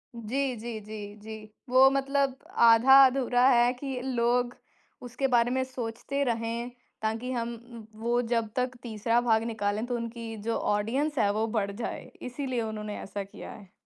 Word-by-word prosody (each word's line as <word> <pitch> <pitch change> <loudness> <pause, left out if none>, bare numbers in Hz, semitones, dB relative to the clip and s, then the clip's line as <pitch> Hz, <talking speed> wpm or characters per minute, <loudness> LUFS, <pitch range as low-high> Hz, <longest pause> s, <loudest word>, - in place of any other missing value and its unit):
जी, 255 +4 -2
जी, 225 0 -5
जी, 210 -1 -8
जी, 220 +1 -9 0.3
वो 260 +1 +7
मतलब 275 0 +1 0.3
आधा-अधूरा 255 +1 +6
है 240 -1 +5
कि 265 0 -5
लोग 245 -1 0 0.5
उसके 250 +2 -2
बारे 235 +1 +3
में 260 0 +1
सोचते 260 +2 -3
रहें 230 0 -2 0.3
ताकि 225 +4 -2
हम 235 -1 -2
उम, 235 -1 -12 0.2
वो 240 +1 +1
जब 230 -2 -1
तक 250 0 -1
तीसरा 230 +1 0
भाग 225 -2 +2
निकालें, 215 -1 -2
तो 245 0 -2
उनकी 230 -1 -5
जो 230 - +1 0.2
ऑडियंस 265 +8 -1
है 205 -2 +3
वो 220 +2 0
बढ़ 200 0 -2
जाए। 225 +4 -5 0.2
इसीलिए 255 -1 -3
उन्होंने 215 -1 -5
ऐसा 200 0 -5
किया 195 - -10
है। 200 -3 -13
235 Hz, 160 wpm, -28 LUFS, 220-255 Hz, 0.5 s, वो